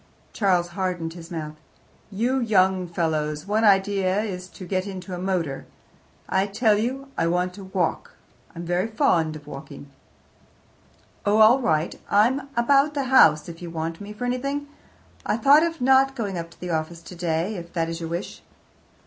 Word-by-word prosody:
Charles 180 -4 +1
hardened 175 -2 -3
his 170 -1 -11
mouth. 155 -3 -6 0.5
"You 235 +6 0
young 190 -5 +2
fellows' 155 -2 -2
one 210 +2 0
idea 195 -1 +3
is 185 -4 -5
to 185 - -11
get 185 +2 -2
into 190 -1 -7
a 180 - -4
motor. 175 -7 -2 0.6
I 190 +1 +1
tell 210 +1 +2
you, 265 +4 -3
I 165 - +2
want 180 +1 0
to 195 0 -10
walk: 190 -3 -2 0.4
I'm 170 +1 -6
very 175 +4 0
fond 175 - +1
of 150 -1 -11
walking." 140 0 -10 1.3
"Oh, 205 +1 +2
all 220 +4 +7
right; 160 -9 +1 0.2
I'm 260 +7 +2
about 275 +5 +3
the 280 - 0
house 155 -10 +6
if 165 0 -9
you 175 - -6
want 165 +1 -4
me 205 +1 -8
for 215 +4 -5
anything. 275 +4 -2 0.6
I 210 - 0
thought 280 +6 +6
of 330 -2 -1
not 265 +1 +4
going 205 -6 -3
up 170 -1 -5
to 170 - -20
the 180 -1 -5
office 165 +1 -3
today, 170 +2 -2
if 170 -2 -8
that 165 -2 0
is 165 0 -4
your 165 -1 -5
wish." 170 +3 -5
185 Hz, 175 wpm, -24 LUFS, 170-220 Hz, 1.3 s, all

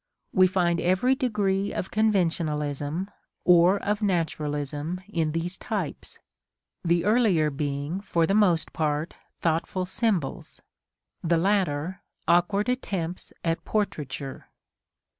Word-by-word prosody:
We 185 0 +6
find 175 -2 +1
every 185 +9 +3
degree 205 -6 0
of 185 - -4
conventionalism 165 -5 0 0.4
or 180 +2 +6
of 210 +1 0
naturalism 155 -3 -1
in 165 -6 0
these 165 +3 -3
types, - - -4 0.7
the 170 0 +2
earlier 205 -9 +3
being, 145 +4 -2
for 170 -5 +1
the 195 - +1
most 190 -6 +3
part, 155 +1 -1 0.3
thoughtful 170 +3 0
symbols; 190 - -2 0.6
the 170 0 +3
latter, 185 -1 0 0.3
awkward 195 +5 +3
attempts 185 -9 -3
at 165 -1 -1
portraiture. 145 - -3
175 Hz, 105 wpm, -26 LUFS, 155-195 Hz, 0.7 s, We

